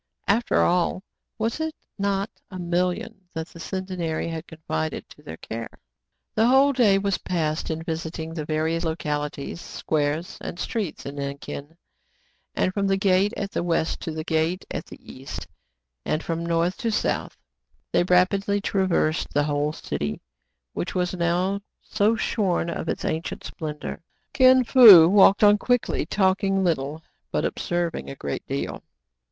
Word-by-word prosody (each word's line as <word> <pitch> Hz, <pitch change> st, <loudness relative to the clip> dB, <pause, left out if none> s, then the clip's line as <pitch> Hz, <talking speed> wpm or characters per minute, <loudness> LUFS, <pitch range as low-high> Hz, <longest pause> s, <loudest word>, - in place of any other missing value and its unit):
After 225 Hz, +4 st, +2 dB
all, 180 Hz, +1 st, +1 dB, 0.3 s
was 225 Hz, +5 st, -1 dB
it 315 Hz, 0 st, -2 dB, 0.2 s
not 200 Hz, +1 st, 0 dB, 0.2 s
a 185 Hz, -, -7 dB
million 180 Hz, +4 st, -1 dB
that 160 Hz, +1 st, -4 dB
the 170 Hz, -, -13 dB
Centenary 180 Hz, -4 st, -3 dB
had 165 Hz, +1 st, -6 dB
confided 80 Hz, -, -4 dB
to -, -, -16 dB
their 80 Hz, -, -9 dB
care 115 Hz, +5 st, -6 dB, 0.4 s
} -, -, -55 dB
The 220 Hz, +2 st, +3 dB
whole 270 Hz, +3 st, +5 dB
day 220 Hz, -7 st, +4 dB
was 195 Hz, -1 st, 0 dB
passed 160 Hz, -4 st, -2 dB
in 160 Hz, 0 st, -3 dB
visiting 160 Hz, -1 st, -4 dB
the 160 Hz, -2 st, -4 dB
various 160 Hz, +2 st, -1 dB
localities, 150 Hz, -1 st, -3 dB
squares, 155 Hz, +2 st, -2 dB
and -, -, -6 dB
streets 205 Hz, -3 st, -3 dB
in 140 Hz, +1 st, -6 dB
Nankin; 140 Hz, +2 st, -6 dB, 0.8 s
and 185 Hz, -, +1 dB
from 200 Hz, 0 st, 0 dB
the 195 Hz, 0 st, +2 dB
gate 195 Hz, +1 st, +3 dB
at 200 Hz, -1 st, -3 dB
the -, -, -1 dB
west 165 Hz, -2 st, 0 dB
to 165 Hz, -, -4 dB
the 155 Hz, 0 st, -4 dB
gate 160 Hz, +3 st, 0 dB
at -, -, -4 dB
the -, -, -11 dB
east, 135 Hz, +1 st, -8 dB, 0.6 s
and 155 Hz, -, -1 dB
from 165 Hz, 0 st, -2 dB
north 170 Hz, +2 st, 0 dB
to 230 Hz, -, -1 dB
south, -, -, -1 dB, 0.5 s
they -, -, +3 dB
rapidly 195 Hz, +3 st, +2 dB
traversed 185 Hz, -5 st, 0 dB
the 145 Hz, -, +4 dB
whole 145 Hz, 0 st, 0 dB
city, 75 Hz, -, -4 dB, 0.5 s
which -, -, -4 dB
was 180 Hz, 0 st, 0 dB
now 180 Hz, +3 st, 0 dB, 0.2 s
so 215 Hz, +1 st, +2 dB
shorn 185 Hz, -6 st, 0 dB
of -, -, -4 dB
its -, -, -3 dB
ancient 160 Hz, +1 st, -3 dB
splendor. 150 Hz, +1 st, -6 dB, 0.3 s
Kin 260 Hz, -1 st, +6 dB
Fo 220 Hz, -10 st, +10 dB
walked 200 Hz, +2 st, +6 dB
on 205 Hz, 0 st, +6 dB
quickly, 245 Hz, +2 st, 0 dB
talk 190 Hz, -1 st, +2 dB
ing 195 Hz, -1 st, +2 dB
little, 155 Hz, -2 st, -1 dB, 0.3 s
but -, -, 0 dB
observing 175 Hz, -1 st, -2 dB
a 135 Hz, -, -6 dB
great 70 Hz, -, -5 dB
deal. 70 Hz, 0 st, -3 dB
175 Hz, 160 wpm, -24 LUFS, 160-195 Hz, 0.8 s, Fo